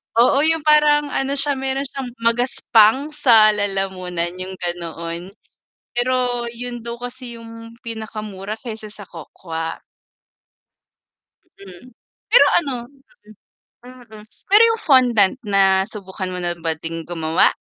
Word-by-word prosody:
Oo 245 Hz, +4 st, +4 dB
'yung 320 Hz, -1 st, +1 dB
parang 295 Hz, -1 st, +4 dB
ano 270 Hz, +1 st, -1 dB
siya 280 Hz, 0 st, +5 dB
meron 270 Hz, +1 st, -2 dB
siyang 270 Hz, -2 st, -6 dB
magaspang 240 Hz, +2 st, +3 dB
sa 230 Hz, -8 st, +5 dB
lalamunan 190 Hz, -4 st, -2 dB
'yung 190 Hz, +1 st, -6 dB
ganoon. 170 Hz, -1 st, -6 dB, 0.6 s
Pero 245 Hz, -1 st, -1 dB
'yun 245 Hz, 0 st, -6 dB
daw 235 Hz, -, -4 dB
kasi 245 Hz, 0 st, -7 dB
'yung 230 Hz, 0 st, -11 dB
pinakamura 215 Hz, -3 st, -6 dB
kesa 220 Hz, -2 st, -8 dB
sa 205 Hz, -, -10 dB
cocoa. 165 Hz, 0 st, -7 dB, 1.8 s
Mm, 195 Hz, +4 st, -13 dB, 0.4 s
pero -, -, +7 dB, 0.2 s
ano, 275 Hz, -5 st, -3 dB, 1.2 s
mm, 255 Hz, -1 st, -14 dB, 0.4 s
pero 415 Hz, +3 st, +6 dB
'yung 455 Hz, 0 st, -1 dB
fondant 245 Hz, -, +4 dB
na 195 Hz, 0 st, +3 dB
subukan 190 Hz, -3 st, -6 dB
mo 180 Hz, -, -5 dB
na 175 Hz, 0 st, -1 dB
ba 160 Hz, -1 st, -2 dB
ding 165 Hz, +1 st, -7 dB
gumawa? 165 Hz, -1 st, +2 dB
225 Hz, 120 wpm, -20 LUFS, 185-255 Hz, 1.8 s, pero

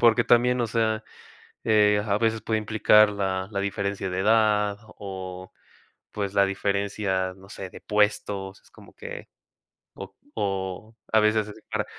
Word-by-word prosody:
porque 120 Hz, 0 st, +5 dB
también, 125 Hz, +1 st, +4 dB
o 120 Hz, -, +1 dB
sea, 110 Hz, -1 st, 0 dB, 0.6 s
eh, 105 Hz, -1 st, +4 dB
a 100 Hz, -1 st, +1 dB
veces 115 Hz, -1 st, +1 dB
puede 110 Hz, -1 st, 0 dB
implicar 105 Hz, 0 st, +5 dB
la 95 Hz, -2 st, -2 dB
la 100 Hz, -, -2 dB
diferencia 100 Hz, -1 st, -2 dB
de 90 Hz, 0 st, -3 dB
edad 105 Hz, -1 st, +3 dB, 0.2 s
o, 95 Hz, -2 st, -7 dB, 0.6 s
pues, 100 Hz, -1 st, -3 dB
la 100 Hz, -, +5 dB
diferencia, 100 Hz, -1 st, -1 dB
no 95 Hz, 0 st, -16 dB
sé, 95 Hz, -2 st, -7 dB
de -, -, -12 dB
puestos, 105 Hz, -2 st, 0 dB
es -, -, -24 dB
como -, -, -17 dB
que -, -, -8 dB, 0.7 s
o 95 Hz, 0 st, -9 dB, 0.2 s
o 95 Hz, +1 st, -3 dB, 0.2 s
a 110 Hz, -, +7 dB
veces 105 Hz, -1 st, +1 dB, 0.2 s
para -, -, -1 dB
105 Hz, 150 wpm, -25 LUFS, 95-110 Hz, 0.7 s, a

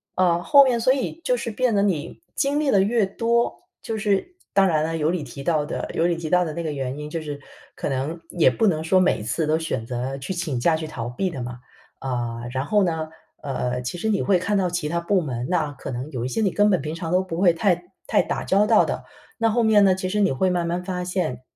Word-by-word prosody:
呃， 175 Hz, -2 st, +2 dB
后 280 Hz, +5 st, +7 dB
面 250 Hz, -3 st, +2 dB
所 255 Hz, +3 st, +4 dB
以 275 Hz, +5 st, -3 dB
就 -, -, +2 dB
是 240 Hz, -, -4 dB
变 240 Hz, +2 st, 0 dB
得， 200 Hz, -, +3 dB
你 185 Hz, -, -1 dB
经 280 Hz, +2 st, +1 dB
历 300 Hz, -2 st, +1 dB
得 195 Hz, -, +5 dB
越 220 Hz, +1 st, +2 dB
多， 235 Hz, +4 st, 0 dB, 0.2 s
就 225 Hz, -, -4 dB
是 210 Hz, -, 0 dB, 0.2 s
当 195 Hz, 0 st, +5 dB
然 155 Hz, -4 st, +2 dB
了， 165 Hz, +1 st, -2 dB
有 155 Hz, 0 st, +1 dB
你 175 Hz, -4 st, -2 dB
提 140 Hz, +1 st, -9 dB
到 155 Hz, -1 st, +1 dB
的 -, -, -4 dB
有 165 Hz, -, +2 dB
你 175 Hz, -, +1 dB
提 165 Hz, -2 st, -5 dB
到 180 Hz, +1 st, +3 dB
的 155 Hz, -, -4 dB
那 170 Hz, -, -4 dB
个 160 Hz, -2 st, -3 dB
原 135 Hz, -2 st, -4 dB
因， 150 Hz, 0 st, -6 dB
就 165 Hz, -, -3 dB
是 145 Hz, -2 st, -6 dB, 0.3 s
可 -, -, -3 dB
能 140 Hz, +5 st, -3 dB
也 175 Hz, -, +4 dB
不 225 Hz, -, +1 dB
能 160 Hz, -5 st, +1 dB
说 185 Hz, +3 st, +3 dB
每 180 Hz, -11 st, +2 dB
次 150 Hz, +9 st, -1 dB
都 155 Hz, +1 st, +2 dB
选 160 Hz, -8 st, -3 dB
择 125 Hz, +2 st, -3 dB
去 140 Hz, +8 st, -4 dB
请 160 Hz, -8 st, -2 dB
假 160 Hz, +6 st, +3 dB
去 160 Hz, -, -5 dB
逃 120 Hz, -6 st, -5 dB
避 185 Hz, +10 st, -2 dB
的 135 Hz, -, -6 dB
嘛。 120 Hz, 0 st, -6 dB, 0.4 s
啊， 120 Hz, -3 st, -3 dB
然 130 Hz, +1 st, -1 dB
后 205 Hz, +6 st, +3 dB
呢， 160 Hz, -3 st, -1 dB, 0.3 s
呃， 125 Hz, -3 st, -2 dB
其 125 Hz, +8 st, -4 dB
实 195 Hz, -, -2 dB
你 205 Hz, -, +1 dB
会 195 Hz, -2 st, +3 dB
看 205 Hz, +4 st, -1 dB
到 190 Hz, -3 st, +2 dB
其 175 Hz, -3 st, -2 dB
它 170 Hz, +3 st, -1 dB
部 185 Hz, +2 st, +2 dB
门， 125 Hz, -5 st, -4 dB
那 165 Hz, -5 st, 0 dB
可 135 Hz, -, -8 dB
能 130 Hz, +4 st, -5 dB
有 125 Hz, -3 st, -3 dB
一 -, -, -1 dB
些 225 Hz, -, -2 dB
你 200 Hz, -4 st, +2 dB
根 205 Hz, 0 st, +3 dB
本 185 Hz, -, +3 dB
平 150 Hz, +2 st, -4 dB
常 165 Hz, 0 st, -5 dB
都 185 Hz, +1 st, +3 dB
不 165 Hz, -3 st, -5 dB
会 175 Hz, -3 st, +5 dB
太 175 Hz, 0 st, +1 dB, 0.2 s
太 -, -, +3 dB
打 -, -, -3 dB
交 200 Hz, +2 st, +3 dB
道 -, -, +5 dB
的， -, -, -3 dB, 0.4 s
那 230 Hz, 0 st, +3 dB
后 235 Hz, +2 st, +2 dB
面 215 Hz, -2 st, +5 dB
呢， 190 Hz, -2 st, +5 dB
其 185 Hz, 0 st, -3 dB
实 210 Hz, +3 st, -1 dB
你 200 Hz, -2 st, +3 dB
会 185 Hz, +8 st, +1 dB
慢 175 Hz, -1 st, 0 dB
慢 175 Hz, +1 st, -1 dB
发 180 Hz, -1 st, -3 dB
现， 180 Hz, -9 st, -2 dB
170 Hz, 285 characters per minute, -23 LUFS, 145-200 Hz, 0.4 s, 后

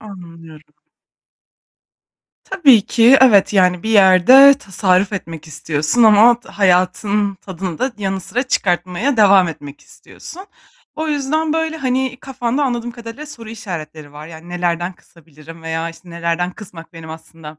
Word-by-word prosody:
Anlıyorum. 165 Hz, -6 st, -13 dB, 1.8 s
Tabii 280 Hz, -, +3 dB
ki, 240 Hz, +3 st, +4 dB
evet, 210 Hz, -6 st, +4 dB
yani, 180 Hz, -3 st, +1 dB
bir 220 Hz, -, -4 dB
yerde 215 Hz, +8 st, +6 dB
tasarruf 195 Hz, -2 st, -1 dB
etmek 165 Hz, -5 st, -7 dB
istiyorsun 155 Hz, +8 st, -2 dB
ama 225 Hz, +2 st, +5 dB
hayatın 200 Hz, +2 st, 0 dB
tadını 185 Hz, -3 st, -8 dB
da 260 Hz, -1 st, -2 dB
yanı 195 Hz, -1 st, -3 dB
sıra 240 Hz, +8 st, -3 dB
çıkartmaya 185 Hz, -, -2 dB
devam 195 Hz, -4 st, +4 dB
etmek 145 Hz, -3 st, -10 dB
istiyorsun. 375 Hz, +3 st, -13 dB, 0.5 s
O 315 Hz, 0 st, -4 dB
yüzden, 300 Hz, +2 st, -2 dB
böyle, 320 Hz, 0 st, -2 dB
hani, 260 Hz, -2 st, -2 dB
kafanda 265 Hz, +1 st, -3 dB
anladığım 240 Hz, -2 st, -3 dB
kadarıyla 235 Hz, +5 st, -10 dB
soru 230 Hz, -7 st, -12 dB
işaretleri 160 Hz, -9 st, -9 dB
var. 150 Hz, +1 st, -11 dB
Yani, 165 Hz, +1 st, -13 dB
nelerden 175 Hz, 0 st, -3 dB
kısabilirim 165 Hz, -1 st, -17 dB
veya, 165 Hz, +1 st, -4 dB
işte, 175 Hz, +1 st, -17 dB
nelerden 170 Hz, +1 st, -3 dB
kısmak 180 Hz, -5 st, -13 dB
benim 165 Hz, -1 st, -11 dB
aslında 160 Hz, -1 st, -12 dB
190 Hz, 135 wpm, -17 LUFS, 165-240 Hz, 1.8 s, yerde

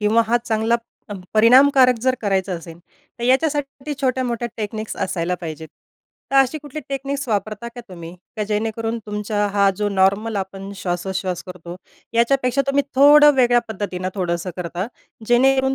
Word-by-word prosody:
किंवा 215 Hz, +2 st, +3 dB
हा 235 Hz, +2 st, +3 dB
चांगला 225 Hz, 0 st, +1 dB, 0.6 s
परिणामकारक 255 Hz, +3 st, +6 dB
जर 260 Hz, 0 st, +2 dB
करायचा 195 Hz, -2 st, 0 dB
असेल. 170 Hz, -1 st, -8 dB, 0.4 s
तर 235 Hz, -, -4 dB
याच्यासाठी 275 Hz, +2 st, 0 dB
छोट्यामोठ्या 250 Hz, -3 st, -1 dB
टेक्निक्स 215 Hz, 0 st, -5 dB
असायला 180 Hz, -2 st, -2 dB
पाहिजेत. 160 Hz, -1 st, -7 dB, 0.6 s
तर 275 Hz, -, +1 dB
अशी 270 Hz, +3 st, +3 dB
कुठली 295 Hz, 0 st, -8 dB
टेक्निक्स 275 Hz, 0 st, -3 dB
वापरता 215 Hz, +2 st, -2 dB
का, 245 Hz, -, -7 dB
तुम्ही? 170 Hz, -2 st, -9 dB, 0.2 s
की 215 Hz, -, -1 dB
जेणेकरून 225 Hz, +2 st, -2 dB
तुमचा 210 Hz, 0 st, -1 dB
हा 200 Hz, -1 st, +4 dB
जो 210 Hz, +1 st, 0 dB
नॉर्मल 200 Hz, +3 st, +1 dB
आपण 195 Hz, 0 st, -5 dB
श्वासोच्छ्वास 180 Hz, -1 st, -3 dB
करतो 180 Hz, -1 st, -9 dB, 0.4 s
याच्यापेक्षा 250 Hz, +3 st, +2 dB
तुम्ही 275 Hz, +1 st, +2 dB
थोडं 295 Hz, +2 st, +7 dB
वेगळ्या 245 Hz, -2 st, +4 dB
पद्धतीने 190 Hz, -4 st, -4 dB
थोडंसं 175 Hz, -2 st, -2 dB
करता, 180 Hz, +1 st, -4 dB, 0.4 s
जेणेकरून 265 Hz, +2 st, +3 dB
220 Hz, 140 wpm, -21 LUFS, 190-260 Hz, 0.6 s, थोडं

